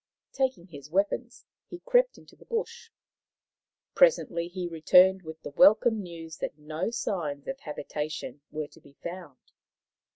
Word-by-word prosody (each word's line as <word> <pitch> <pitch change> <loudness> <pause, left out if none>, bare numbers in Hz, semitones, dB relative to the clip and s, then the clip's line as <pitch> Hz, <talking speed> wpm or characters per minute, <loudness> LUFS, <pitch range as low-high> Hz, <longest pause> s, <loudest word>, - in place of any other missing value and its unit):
Taking 260 -10 -1
his 145 -5 -12
weapons, 205 +7 -1 0.2
he 350 - -8
crept - - +3
into - - -17
the - - -19
bush. 465 0 -4 1.0
Presently 320 - +3
he 180 0 -4
returned 180 +3 +5
with 160 -2 -9
the - - -6
welcome 215 +7 +5
news 165 -3 -9
that - - -4
no 155 +5 -3
signs 160 -11 -3
of 270 - -4
habitation 150 - -5
were 155 -1 -4
to - - -19
be 140 - -18
found. 170 -6 -7
175 Hz, 140 wpm, -28 LUFS, 155-235 Hz, 1.0 s, returned